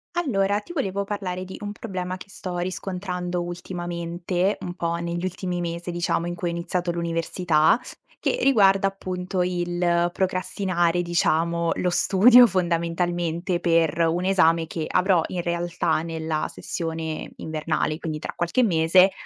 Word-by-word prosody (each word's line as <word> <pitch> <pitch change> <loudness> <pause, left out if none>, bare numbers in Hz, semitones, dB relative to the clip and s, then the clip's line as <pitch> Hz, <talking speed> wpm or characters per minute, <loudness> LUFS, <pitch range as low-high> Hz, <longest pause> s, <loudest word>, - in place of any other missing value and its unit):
Allora, 205 - +1
ti 345 - -10
volevo 200 - -1
parlare 190 -3 -4
di 190 - -8
un 205 0 -4
problema 185 -4 -5
che 190 - -13
sto 185 -2 -6
riscontrando 180 0 -3
ultimamente, 175 +1 -2
un 175 - -5
po' 170 -1 -2
negli 170 +1 -3
ultimi 180 -1 -3
mesi 170 +1 -4
diciamo 170 -1 -1
in 175 - -3
cui 175 0 -3
ho - - -2
iniziato 175 +1 -2
l'università, 170 +1 +2 0.4
che - - 0
riguarda 195 -7 +5
appunto 185 -1 -3
il 175 -1 +1
procrastinare, 185 -1 0
diciamo, 170 0 +1
lo 180 - 0
studio 240 +8 +7
fondamentalmente 175 -1 -1
per 165 -2 +2
un 175 +3 0
esame 165 -4 +3
che 160 -1 -4
avrò 180 -1 +3
in 175 -2 -3
realtà 170 -2 0
nella 160 -1 -2
sessione 160 -2 -4
invernale, 155 0 -2
quindi 160 -3 -4
tra 150 - -6
qualche 175 +9 +1
mese, 180 0 +5
175 Hz, 140 wpm, -24 LUFS, 170-185 Hz, 0.4 s, studio